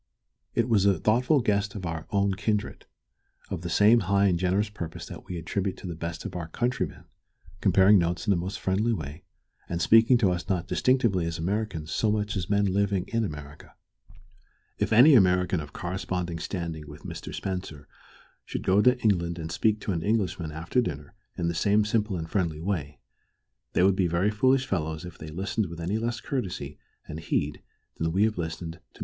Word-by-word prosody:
It 115 -1 +2
was 105 -4 +3
a 100 -3 +4
thoughtful 125 - +3
guest 100 -2 0
of 95 -3 -5
our 80 -1 -4
own 100 -1 +1
kindred, 105 +2 -2 0.6
of 95 -4 -3
the 85 - -4
same 105 +7 +5
high 100 0 +2
and 90 -3 +2
generous 95 +4 +1
purpose 85 -6 -7
that - - -10
we 90 - -5
attribute 95 +4 -2
to - - -11
the 90 - -4
best 85 0 -6
of - - -6
our 85 -2 -4
countrymen, 120 +7 -2 0.6
comparing 95 +1 +5
notes 85 +1 -1
in 105 - +2
the - - +4
most 90 +3 -3
friendly 105 +5 +1
way, 75 -3 -6 0.4
and 85 - -2
speaking 115 +6 +6
to 100 -6 +3
us 90 -1 -4
not 90 -2 0
distinctively 115 -10 +2
as 85 0 -3
Americans 90 -3 -2
so 110 - +1
much 105 0 -1
as 90 -4 -3
men 100 0 +3
living 100 -1 +1
in 115 0 0
America. 75 -6 -8 1.0
If - - 0
any 125 +8 +8
American 90 -5 +4
of 75 -2 -7
corresponding 90 -1 -3
standing 80 -4 -4
with 75 +1 -11
Mr. - - -7
Spencer 90 -7 -5 0.6
should - - -5
go 95 +2 +4
to 125 +3 +4
England 85 -5 +1
and 80 -1 -5
speak 105 +4 +1
to - - -2
Englishmen 90 -2 -1
after 85 +11 0
dinner 75 -10 -5 0.2
in 85 - -1
the 85 - 0
same 105 +4 +2
simple 105 -3 0
and 80 -1 -4
friendly 85 -5 -1
way, 80 -5 -3 0.7
they - - +3
would 95 0 +4
be 95 -2 +2
very 85 +5 +1
foolish 130 +5 +3
fellows 80 -7 -2
if 90 - -10
they 80 - -8
listened 100 +6 -2
with 85 0 -8
any 95 +6 -1
less 115 0 -2
courtesy 90 - -4 0.3
and 75 - -7
heed 80 - -2 0.4
than 80 0 0
we 95 +5 +2
have 110 -3 +1
listened 80 0 -4
to 85 - -17
Mr. - - -37
Spencer. - - -17
95 Hz, 195 wpm, -27 LUFS, 85-105 Hz, 1.0 s, any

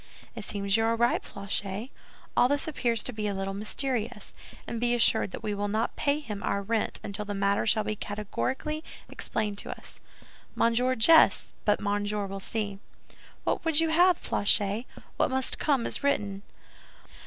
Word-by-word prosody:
"It - - -6
seems 200 0 +1
you 225 - +2
are 230 0 +2
right, 235 +1 +2
Planchet; 200 +4 -4 0.4
all 245 - +5
this 285 +3 0
appears 240 -7 0
to 250 - -1
be 215 -1 -2
a 200 - -2
little 195 0 -3
mysterious; 225 +2 -2 0.3
and 235 0 -4
be 240 0 +2
assured 230 -3 +4
that 205 - -8
we 210 -1 -1
will 205 0 -2
not 220 +3 -1
pay 285 +1 +1
him 210 -9 -6
our 200 +1 -1
rent 220 +2 -1
until 200 +1 -4
the 205 -1 -4
matter 200 +2 +1
shall 215 0 +3
be 215 - -2
categorically 260 +10 -3 0.3
explained 210 -2 -2
to - - -5
us." - - -9 0.6
"Monsieur 245 +3 +2
jests, 320 +9 +5
but 210 - +3
Monsieur 205 0 -1
will 195 0 -6
see." 205 -1 -3 0.6
"What - - -1
would 325 -2 +2
you 325 0 +3
have, 350 +2 +5
Planchet? 205 +3 +2 0.3
What - - +2
must 260 0 0
come 275 -6 +2
is - - -2
written." 205 -8 0
215 Hz, 175 wpm, -28 LUFS, 205-250 Hz, 0.6 s, all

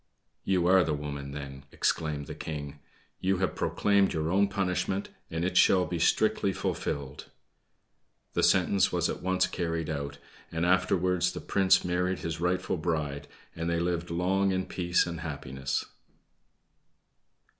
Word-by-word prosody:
"You 90 -3 +1
are 95 +1 +6
the 75 - 0
woman 70 -1 -5
then!" 70 -1 -8
exclaimed 75 -3 -1
the - - -7
King; 75 -2 -6 0.4
"You 95 0 +1
have 95 0 0
proclaimed 100 -1 +2
your 80 0 -1
own 100 +2 +4
punishment, 95 0 -1 0.2
and 80 +1 -2
it 90 0 0
shall 90 0 +5
be 85 +1 -3
strictly 105 +3 +2
fulfilled." 70 -5 -3 1.1
The - - +1
sentence 100 - +3
was - - +1
at - - -4
once 95 +1 +2
carried 85 -2 -2
out, 70 -1 -4 0.3
and 80 +1 -1
afterwards 90 0 +2
the - - -5
Prince 95 -2 +3
married 90 +1 0
his 80 -1 -4
rightful 90 +1 0
bride, 75 -4 -2 0.3
and 85 0 -2
they 85 0 +1
lived 85 0 -1
long 95 +3 +1
in 95 0 -1
peace 90 -1 +1
and 85 -2 -5
happiness. 70 -4 -3
85 Hz, 145 wpm, -29 LUFS, 75-95 Hz, 1.1 s, are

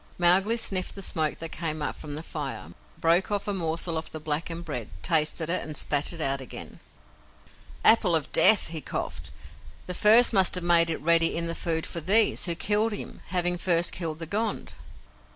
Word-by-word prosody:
Mowgli 190 +6 +3
sniffed 185 -5 0
the 195 - -7
smoke 155 -4 -2
that 165 - -7
came 155 -1 -5
up 145 - -5
from 145 -1 -9
the 155 - -8
fire, 150 -4 -8 0.3
broke 170 +3 +1
off 205 -1 -3
a 205 - -2
morsel 165 -2 -3
of 160 - -8
the 155 - -9
blackened 165 +3 -5
bread, 125 -9 -6
tasted 160 0 0
it, 180 +2 0
and 155 -1 -7
spat 145 0 0
it 170 - -5
out 135 -3 -2
again. 130 - -10 1.1
"Apple 210 -6 +4
of 155 -3 -3
Death," 215 -5 +7
he 160 -2 -6
coughed. - - -7 0.5
"The 180 - -7
first 225 +6 +6
must 190 -3 +3
have 180 - -4
made 170 -1 +3
it 160 - -3
ready 165 0 +3
in 170 - -2
the 165 - -4
food 165 -1 -3
for 170 - -5
THESE, 205 +7 +5
who 170 -2 -3
killed 210 +4 0
him, 205 - -8
having 175 0 -1
first 175 -1 +1
killed 165 -3 -5
the 165 - -8
Gond." 215 +7 -4
170 Hz, 195 wpm, -25 LUFS, 160-185 Hz, 1.1 s, Death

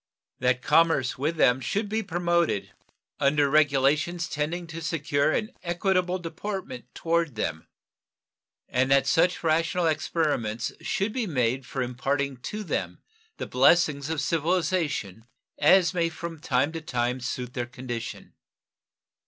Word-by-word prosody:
That 125 0 +1
commerce 160 -6 +3
with 155 +5 0
them 125 -5 +4
should 205 - -1
be 220 +2 -1
promoted 170 - 0 0.5
under 145 +1 +3
regulations 150 +4 +2
tending 160 +4 -3
to 165 0 -7
secure 150 -2 0
an 215 +5 -1
equitable 180 +1 0
deportment 175 - -6
toward 165 -4 0
them, 80 -6 -3 1.0
and 130 +1 +1
that 140 0 +4
such 175 +2 +2
rational 165 +2 +1
experiments 155 -8 0
should 210 -2 -1
be 245 -4 -1
made 130 -3 0
for 130 - -2
imparting 135 +2 -2
to 210 - -5
them 185 - -3 0.4
the - - -4
blessings 140 +2 +3
of 160 -2 -1
civilization 160 - -1 0.3
as 175 +5 +5
may 170 -2 +1
from 165 0 -7
time 135 +1 +1
to 165 0 -5
time 125 -3 -1
suit 125 0 -4
their 120 -1 -3
condition. 120 -2 -7
155 Hz, 130 wpm, -26 LUFS, 130-170 Hz, 1.0 s, as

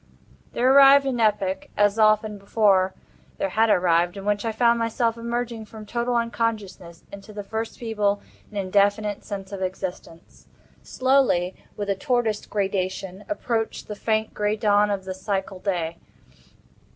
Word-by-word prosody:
There 255 +2 +3
arrived 275 0 +8
an 260 -3 -1
epoch—as 205 0 +1
often 215 -1 +3
before 195 -2 +2 0.4
there 195 - -1
had 220 +4 +2
arrived—in 175 +1 +2
which 205 +1 0
I 225 - 0
found 235 +1 +3
myself 230 0 0
emerging 235 -1 -4
from 215 0 -11
total 240 +2 -1
unconsciousness 220 -7 -3
into 200 +1 -10
the 205 -1 -6
first 220 +2 -4
feeble 210 -3 0 0.3
and 210 - -9
indefinite 200 +2 +1
sense 195 -1 -7
of 195 -1 -6
existence. 185 -2 -6 0.3
Slowly—with 210 -7 0
a 200 - +2
tortoise 225 +1 -1
gradation—approached 200 +4 -3
the 210 - -5
faint 220 +1 -1
gray 210 0 0
dawn 210 -1 +3
of 195 -2 -2
the 190 - -4
psychal 190 -1 -4
day. 170 -4 -2
210 Hz, 135 wpm, -24 LUFS, 195-230 Hz, 0.4 s, arrived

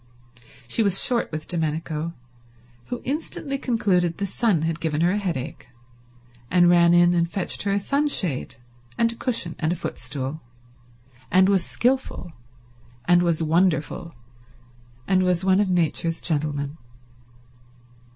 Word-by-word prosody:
She 225 - +1
was 200 -3 +5
short 240 -2 +1
with 155 -1 -5
Domenico, 160 -1 -2 0.7
who 245 - -5
instantly 275 -1 -3
concluded 190 -9 0
the 200 - -2
sun 195 -4 0
had 165 0 -2
given 160 -2 -1
her 175 +1 +3
a 205 - 0
headache, 165 -10 -4 0.8
and 175 -1 +5
ran 170 0 +5
in 175 0 +5
and 170 -1 +1
fetched 190 0 -2
her 200 - -1
a 200 - +2
sunshade 205 - 0 0.4
and 230 0 +2
a - - -9
cushion 225 -9 -2
and 160 -1 0
a - - 0
footstool, 135 -1 -5 0.9
and 185 +1 +4
was 195 -3 +3
skilful, 250 -9 -1 0.7
and 175 0 +4
was 170 -2 +1
wonderful, 165 -1 0 0.9
and 185 -1 +3
was 180 0 +1
one 190 0 +4
of 205 -2 +1
Nature's 165 -1 0
gentlemen. 145 -1 -2
175 Hz, 135 wpm, -23 LUFS, 160-200 Hz, 0.9 s, was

